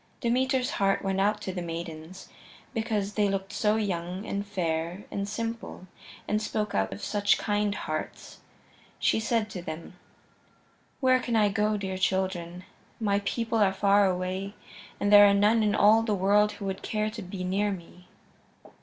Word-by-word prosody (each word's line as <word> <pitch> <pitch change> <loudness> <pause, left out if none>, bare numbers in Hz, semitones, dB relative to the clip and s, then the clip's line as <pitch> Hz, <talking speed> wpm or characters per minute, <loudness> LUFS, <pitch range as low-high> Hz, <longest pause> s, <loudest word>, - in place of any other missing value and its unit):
Demeter's 255 +1 +1
heart 195 0 +1
went 195 0 0
out 210 +1 +1
to 190 - -4
the 180 - -4
maidens, 165 +1 -7 0.5
because 215 -3 -1
they 205 -1 +2
looked 195 +1 -3
so 210 0 +2
young 185 -2 -3
and 200 -1 -3
fair 170 -1 -2
and 200 0 -3
simple 225 -3 -5 0.4
and 210 0 0
spoke 215 -1 -2
out 95 -1 0
of 95 - -7
such 205 -1 +2
kind 205 -1 0
hearts. 155 -5 -5 0.6
She - - +2
said 225 -1 0
to 180 - -5
them: 165 0 -7 1.1
"Where 255 -1 +4
can 240 -2 -2
I 210 -2 +4
go, 210 +1 +1
dear 190 -2 -4
children? 185 -2 -1 0.4
My 200 -3 +1
people 230 +1 -1
are 200 -2 +4
far 200 0 +4
away, 185 +2 -3 0.4
and 205 0 +1
there 205 0 +10
are 200 - +4
none 210 +3 +4
in 210 -1 +2
all 215 +2 +6
the 220 -2 0
world 205 +2 +3
who 200 - -8
would 190 -1 -3
care 215 0 -2
to 220 0 -7
be 185 0 -6
near 200 +3 0
me." 180 -1 -10
200 Hz, 170 wpm, -27 LUFS, 185-215 Hz, 1.1 s, there